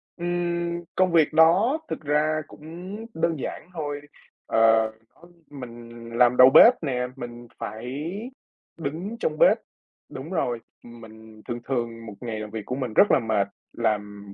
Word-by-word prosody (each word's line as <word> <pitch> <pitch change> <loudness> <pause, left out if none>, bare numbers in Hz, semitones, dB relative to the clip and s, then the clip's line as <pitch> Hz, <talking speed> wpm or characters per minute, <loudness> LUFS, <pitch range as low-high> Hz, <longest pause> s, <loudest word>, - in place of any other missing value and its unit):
Ừm, 175 0 -2
công 185 -1 +3
việc 160 -2 +4
đó 185 - +5
thực - - -4
ra 155 +1 +1
cũng 175 +6 -9 0.2
đơn 165 -2 0
giản 170 - -6
thôi, 145 -3 -4 0.5
ờ, 110 0 +4 0.3
ưm, 175 - -17 0.2
mình 120 -4 -10
làm 125 0 +4
đầu 130 0 +9
bếp 230 - +9
nè, 125 -4 -1
mình 120 -2 -8
phải 125 +7 -5 0.7
đứng 165 +9 -5
trong 155 -9 -1
bếp - - +6 0.5
đúng 135 +4 -8
rồi, 120 -10 -1 0.2
ừm, 120 0 -13
mình 110 -1 -14
thường 120 0 -3
thường 115 -3 -3
1 110 - -8
ngày 115 -3 -4
làm 105 0 -6
việc 110 -2 -6
của 125 - -3
mình 125 -5 -4
rất 205 - +5
là - - +5
mệt, 110 -4 0 0.3
làm 105 -3 -2
130 Hz, 160 wpm, -25 LUFS, 115-165 Hz, 0.7 s, đầu